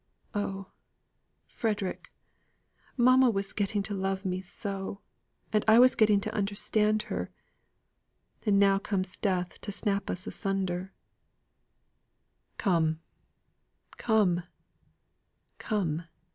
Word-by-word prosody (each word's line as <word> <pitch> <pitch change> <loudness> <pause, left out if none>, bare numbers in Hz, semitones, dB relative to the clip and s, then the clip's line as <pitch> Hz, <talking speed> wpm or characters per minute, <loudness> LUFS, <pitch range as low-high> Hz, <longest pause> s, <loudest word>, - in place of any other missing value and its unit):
Oh, 195 -2 -3 0.8
Frederick! 205 -4 -3 0.9
mamma 255 +1 +6
was 195 -3 -1
getting 205 0 0
to 205 - -1
love 195 0 -2
me 185 0 -1
so! 195 +1 -5 0.5
And 215 - +3
I 220 +1 +7
was 255 +1 +7
getting 210 -2 +4
to - - -3
understand 210 +1 +1
her. - - -4 1.1
And 205 -3 +3
now 195 -1 +5
comes 190 -2 -2
death 180 -3 -2
to 205 - -4
snap 200 -1 -1
us 180 - -3
asunder!" 190 -1 -2 1.7
"Come, 160 -6 +1 1.0
come, 205 -6 +3 1.2
come! 175 -7 -1
200 Hz, 100 wpm, -29 LUFS, 190-210 Hz, 1.7 s, I